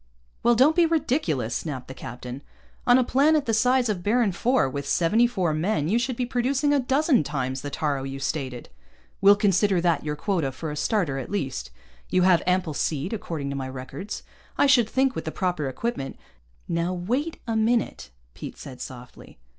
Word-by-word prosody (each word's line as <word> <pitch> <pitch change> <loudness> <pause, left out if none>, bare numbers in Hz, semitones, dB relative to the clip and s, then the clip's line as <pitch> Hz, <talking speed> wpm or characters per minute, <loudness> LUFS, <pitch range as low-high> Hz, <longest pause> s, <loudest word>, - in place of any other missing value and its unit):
"Well, 240 0 +4
don't 275 +7 +5
be 345 -1 +5
ridiculous," 250 - 0
snapped 135 -2 -4
the 130 - -7
captain. 125 +1 -8 0.5
"On 245 0 +7
a 260 - +4
planet 285 +4 +3
the 225 - 0
size 250 +2 +3
of 205 -5 -1
Baron 220 +2 +2
IV, 205 - +1
with 140 0 -4
seventy 210 +8 +3
four 185 -9 0
men, 155 -1 0
you 225 +5 +3
should 245 +1 -1
be 250 - -1
producing 270 +4 +1
a 285 - +3
dozen 270 - +2
times 130 -3 -3
the 145 - -5
taaro 140 -1 -1
you 135 0 -5
stated. 135 -3 -4 0.5
We'll 200 +1 +8
consider 200 -1 +2
that 170 -1 +1
your 150 0 -2
quota 165 -4 -1
for 150 +4 -6
a - - -5
starter, 150 -4 0
at - - -6
least. 135 - -3 0.4
You 185 0 +3
have 180 -2 +5
ample 180 -3 +1
seed, 150 +6 -2
according 160 -9 -4
to - - -4
my 135 -1 -4
records. 130 +10 -7 0.3
I - - +4
should 245 -5 +4
think, 265 +1 +2
with - - -5
the 160 - -3
proper 175 -7 -1
equipment 135 - -4 0.3
" - - -35
"Now 170 +2 -1
wait 250 - -2
a 225 -1 -2
minute," 225 - 0 0.2
Pete - - -8
said 130 -3 -10
softly. 125 -1 -10
185 Hz, 195 wpm, -25 LUFS, -, 0.5 s, We'll